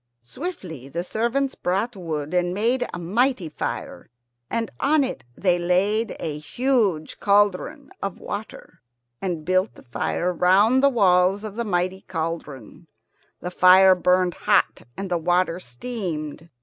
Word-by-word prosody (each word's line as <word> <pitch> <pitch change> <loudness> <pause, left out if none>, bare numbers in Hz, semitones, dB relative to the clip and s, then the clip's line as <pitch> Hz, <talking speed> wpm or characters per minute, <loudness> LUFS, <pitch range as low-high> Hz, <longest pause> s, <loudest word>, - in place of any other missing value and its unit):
Swiftly 160 - -7
the 170 +5 -3
servants 235 +7 -1
brought 200 +6 -1
wood 155 -4 -4
and 180 0 +1
made 245 +4 +1
a - - -5
mighty 200 +2 0
fire, 150 - -5 0.4
and 230 -1 -2
on 295 +1 +3
it 260 - -4
they 180 -2 +2
laid 200 +6 +1
a 150 -1 -4
huge 215 - 0
cauldron 205 +9 +1
of 195 -2 -3
water, 205 - -8 0.4
and 175 -5 -3
built 185 +3 +1
the - - -15
fire 170 +8 -2
round 200 +9 +4
the 280 - +5
walls 195 -4 +3
of 210 -2 -6
the 190 -4 -1
cauldron. 160 -2 -5 0.5
The 180 - -4
fire 185 +1 +7
burned 180 0 +2
hot - - +1 0.2
and 195 -1 -5
the 175 - +1
water 175 +1 +1
steamed. 160 - -6
185 Hz, 135 wpm, -23 LUFS, 170-220 Hz, 0.5 s, fire